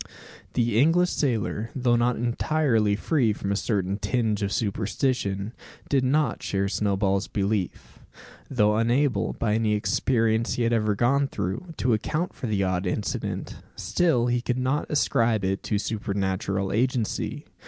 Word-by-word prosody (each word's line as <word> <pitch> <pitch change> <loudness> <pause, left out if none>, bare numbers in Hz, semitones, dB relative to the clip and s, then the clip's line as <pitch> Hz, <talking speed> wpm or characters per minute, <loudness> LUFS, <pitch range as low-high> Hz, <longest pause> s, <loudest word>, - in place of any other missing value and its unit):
The 115 -2 +2
English 170 +6 +4
sailor, 115 -4 -1
though 125 -2 +2
not 120 +1 +2
entirely 120 -3 +1
free 120 -1 +1
from 100 -1 -3
a - - +1
certain 100 -2 -1
tinge 110 0 0
of 100 0 -1
superstition, 105 0 -1 0.4
did 135 -2 +2
not 145 +4 +1
share 100 0 -1
Snowball's 100 -1 0
belief. 100 -3 -2 0.5
Though 105 -5 +2
unable, 120 -1 +1
by 105 -2 -1
any 110 -1 +1
experience 110 +2 +1
he 120 - 0
had 115 0 +2
ever 105 -2 +1
gone 135 +6 +2
through, 120 - -4
to 125 - +2
account 155 +11 -1
for 125 - -5
the 100 -3 0
odd 95 0 -1
incident, 100 +3 -3 0.2
still 160 -10 +1
he 120 0 +1
could 125 0 -1
not 130 +3 -1
ascribe 115 -8 +2
it 95 +1 -1
to 105 - 0
supernatural 100 -2 -2
agency. 120 -1 -1
110 Hz, 145 wpm, -25 LUFS, 100-125 Hz, 0.5 s, English